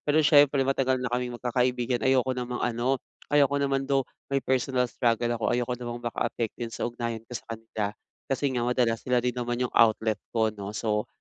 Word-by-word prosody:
Pero 145 +1 +4
siyempre, 145 -2 +5
matagal 130 -1 +1
na 125 - -3
kaming 125 -1 -1
magkakaibigan 125 0 0
ayoko 130 -1 +3
namang 125 -1 -3
ano, 120 +3 0 0.3
ayoko 140 -1 +4
naman 135 -1 +1
though, 135 -1 +2 0.3
may 135 - +2
personal 130 0 +1
struggle 120 0 +1
ako, 115 - -4
ayoko 125 0 0
namang 120 -1 -5
makaapekto 120 -1 -2
'yon 115 - -7
sa - - -5
ugnayan 115 -2 -4
ko - - -12
sa - - -11
kanila 110 -1 -5 0.4
kasi 135 +1 -1
nga 125 - 0
madalas 120 -2 +2
sila 125 -1 +1
din 125 0 0
naman 120 0 -2
'yong 125 - -2
outlet 110 -1 +3 0.2
ko, 110 -1 +3
'no? 105 0 -7
So, 105 -2 -1
125 Hz, 195 wpm, -27 LUFS, 115-130 Hz, 0.4 s, siyempre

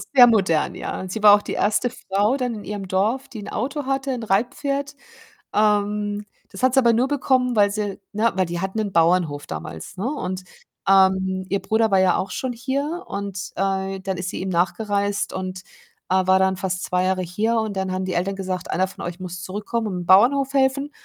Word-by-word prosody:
sehr 250 -2 +10
modern, 190 -9 +2
ja. - - -5
Und 185 0 -6
sie 220 - -4
war 205 -1 +9
auch 205 - +2
die - - -5
erste 215 +4 +1
Frau 205 +2 0
dann 250 -3 -2
in 210 - -8
ihrem 205 -2 -5
Dorf, 220 +9 0
die 220 - -8
'n - - -8
Auto 275 +5 -3
hatte, 270 0 -1
'n 245 - -4
Reitpferd. 275 +7 -1 0.6
Ähm, 210 0 +1 0.3
das 195 - -8
hat 255 -1 +4
sie 270 - +5
aber 235 -2 +4
nur 250 +4 +2
bekommen, 260 -3 +1
weil 205 -1 +4
sie, 205 -2 -3
ne 220 +2 +1
weil 185 -1 +2
die 170 0 -4
hatten 190 +3 -3
'nen 205 -2 -1
Bauernhof 165 -4 +2
damals, 80 - -7
ne, 195 - -3
und, 185 -10 -3 0.4
ähm, 190 -1 +3
ihr 200 +1 +1
Bruder 220 0 +2
war 195 - +5
ja 185 -1 +3
auch 190 -1 -3
schon 255 +5 -3
hier 280 +8 -3
und 200 -2 -5
äh, 195 0 -1
dann 190 -1 -3
ist 180 0 -3
sie - - -5
ihm 190 - -3
nachgereist 200 +3 0
und, 185 0 -5 0.5
äh, 185 0 +2
war 190 0 +5
dann 190 0 +2
fast 185 -1 -3
2 180 0 0
Jahre 185 0 +1
hier 210 +6 -1
und 215 -3 -3
dann 190 -1 -1
haben 185 0 -2
die 185 - -3
Eltern 190 +3 -1
gesagt: 185 -1 -4
„Einer 185 +1 +1
von 190 - -10
euch 175 +1 -6
muss 180 -1 -6
zurückkommen 210 +4 -3
und 195 - -3
im 175 - -6
Bauernhof 265 +9 +5
helfen.“ 275 +1 +1
200 Hz, 215 wpm, -22 LUFS, 185-235 Hz, 0.6 s, sehr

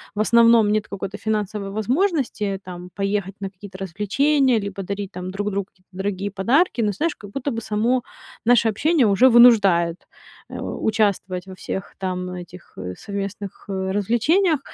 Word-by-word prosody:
в - - -4
основном 230 -1 +5
нет 215 0 0
какой-то 200 0 -6
финансовой 210 -2 -2
возможности 235 - 0
там 180 0 -9
поехать 195 -1 -2
на 195 - -3
какие-то 190 0 -12
развлечения, 250 - +2
либо 200 -1 -5
дарить 200 +1 -5
там 180 +1 -6
друг 205 +2 -2
другу 200 0 -2
какие-то 185 -1 -36
дорогие 195 +1 -3
подарки. 245 - +2
Но 210 -2 +1
знаешь, 310 - -1
как 205 -1 -12
будто 275 +4 -3
бы 230 - -3
само 230 +4 0 0.4
наше 235 -1 +4
общение 290 +4 +2
уже 205 +6 +5
вынуждает, 200 -8 +5 0.4
э, - - -7
участвовать 200 -4 -1
во 190 - -9
всех 190 +1 -6
там 180 -1 -3
этих, 180 0 -10
э, 90 -1 -5
совместных, 200 -1 -6
э, 190 -1 -2
развлечениях. 270 - +2
205 Hz, 160 wpm, -22 LUFS, 190-235 Hz, 0.4 s, основном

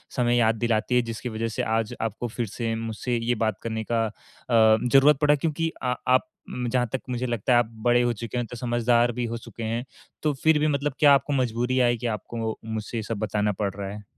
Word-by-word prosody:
समय 120 -1 +2
याद 115 -1 +3
दिलाती 115 +1 0
है? 125 - +5
जिसकी 115 +1 -5
वजह 115 0 -2
से 115 - -3
आज 115 +1 -1
आपको 115 +2 -3
फिर 120 +1 -3
से 115 +2 -3
मुझसे 115 +2 -3
ये 115 +1 0
बात 110 -3 -1
करने 110 -1 -3
का 115 -1 +2
अ, 105 - -4 0.4
ज़रूरत 120 +6 +5
पड़ा 150 0 +5
क्योंकि 160 +2 -1
अ, 125 0 +1
आप 130 0 +3 0.4
जहाँ 125 0 +1
तक 130 - -1
मुझे 125 0 -2
लगता 120 0 0
है 120 - +6
आप 120 - +2 0.2
बड़े 120 0 +5
हो 120 0 +1
चुके 115 +2 -5
हैं 120 - -1
तो 125 - -8
समझदार 120 0 +2
भी 120 +1 -3
हो 115 0 -3
चुके 115 0 -9
हैं। 115 +2 -2 0.4
तो 150 - +2
फिर 160 -1 +5
भी 155 - +2
मतलब 140 -1 0
क्या 145 -2 +7
आपको 140 +1 +2
मजबूरी 125 0 0
आई 120 -1 +3
की 120 +1 -3
आपको 110 +1 -3
मुझसे 110 +1 -4
ये 110 - -2
सब 110 0 -4
बताना 105 0 0
पड़ 100 -2 0
रहा 100 -1 -5
है? 105 +1 -8
120 Hz, 235 wpm, -25 LUFS, 110-125 Hz, 0.4 s, क्या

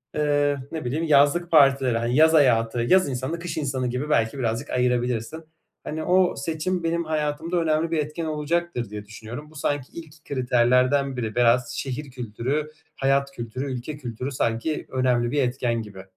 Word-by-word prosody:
eee, 145 -1 +2
ne 160 -5 -5
bileyim, 150 +7 -1
yazlık 155 +4 +3
partileri, 135 -5 +5
ha 115 - -1
yaz 155 +6 +5
hayatı, 120 -6 +3
yaz 185 +5 +3
insanı, 130 +6 -3
kış 170 -1 -5
insanı 130 -4 -1
gibi 125 +5 -3
belki 115 -3 +1
birazcık 120 +3 -2
ayırabilirsin. 125 +4 -1 0.4
Hani, 155 +1 -4
o 185 0 +3
seçim 170 +2 -2
benim 170 +1 0
hayatımda 155 +2 -1
önemli 165 0 +1
bir 165 - +1
etken 155 +2 -3
olacaktır 155 -5 -2
diye 105 -1 -7
düşünüyorum. 115 +7 -9
Bu - - -18
sanki 145 -2 -2
ilk 160 -2 -11
kriterlerden 130 +1 +2
biri. 110 -3 -3
Biraz 120 0 +3
şehir 135 +1 -5
kültürü, 125 +5 -3 0.2
hayat 140 0 +1
kültürü, 130 +2 -5
ülke 130 +5 -5
kültürü 125 0 -5
sanki 120 +5 -2
önemli 125 -2 +1
bir 145 - +1
etken 120 -2 -1
gibi. 100 -3 -10
140 Hz, 165 wpm, -24 LUFS, 120-155 Hz, 0.4 s, partileri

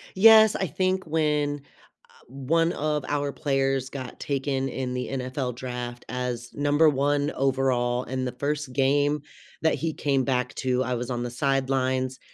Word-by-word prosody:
Yes, 220 +1 +8
I 190 - -1
think 185 +4 0
when, 150 -2 0 0.5
uh, - - -24
1 160 +6 0
of 150 -2 -1
our 145 -1 -1
players 135 -2 0
got 130 -3 -7
taken 135 -1 -1
in 130 -1 -3
the 125 0 -3
NFL 130 -1 -3
draft 125 -1 -6
as 125 -1 -4
number 145 +2 +3
1 145 +1 +1
overall 130 -2 +1
in 130 0 -3
the 125 - -2
1st 145 +1 -3
game 145 +2 +2 0.4
that 160 - +3
he 165 0 -2
came 140 -3 0
back 125 -1 -1
to- 130 -1 0
I 125 0 -2
was 120 +1 -4
on 120 -1 -2
the 120 - -4
sidelines- 130 -1 0
135 Hz, 160 wpm, -26 LUFS, 125-145 Hz, 0.5 s, Yes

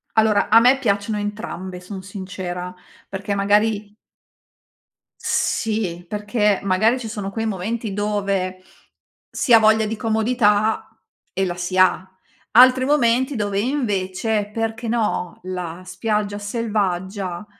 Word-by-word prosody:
Allora 215 -2 +3
a 225 - +7
me 250 +3 +5
piacciono 210 -3 0
entrambe, 205 -3 -5
son 190 +1 -8
sincera. 185 -2 -6 0.3
Perché 200 +1 -3
magari 205 +1 +1 1.3
Sì, 195 -6 -1
perché 210 0 0
magari 200 +6 +2
ci 245 - -7
sono 210 -3 -5
quei 225 +2 -3
momenti 220 +2 -3
dove 195 -2 -2 0.7
si 260 - 0
ha 230 - +10
voglia 220 0 +4
di 215 +1 -2
comodità 220 -1 +1 0.5
e 195 - +1
la 175 -2 -3
si 180 +1 -3
ha. 185 0 +3 0.4
Altri 255 +2 +7
momenti 260 -1 +2
dove 205 -2 -1
invece, 210 -4 -1
perché 225 +1 -3
no, 220 -6 -1
la 180 -1 -5
spiaggia 210 +1 -2
selvaggia, 200 -3 -2
205 Hz, 120 wpm, -21 LUFS, 190-225 Hz, 1.3 s, ha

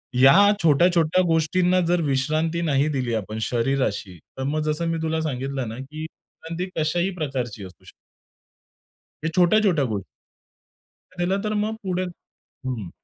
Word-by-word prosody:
या 135 +2 +7 0.3
छोट्या-छोट्या 165 +2 +4
गोष्टींना 175 +3 +2
जर 175 0 +2
विश्रांती 155 +4 0
नाही 145 -3 +2
दिली 130 -5 -1
आपण 110 0 -4
शरीराशी 115 -6 -1 0.2
तर 130 - -3
मग 150 +3 -1
जसं 155 +2 -1
मी 165 - -1
तुला 160 0 -1
सांगितलं 135 -3 -3
ना 115 - -7
की 145 +4 -8
विश्रांती 165 +2 -7
कशाही 170 +4 0
प्रकारची 130 - -4
असू 95 -1 -13
शकते. - - -14 1.3
हे 160 - 0
छोट्या-छोट्या 180 -3 +4
गोष्टी. 105 -5 -3 1.2
दिलं 190 +3 0
तर 215 0 -2
मग 220 +1 -2
पुढे 185 -1 -1 0.6
हं. 115 -8 -4
155 Hz, 140 wpm, -23 LUFS, 130-170 Hz, 1.3 s, या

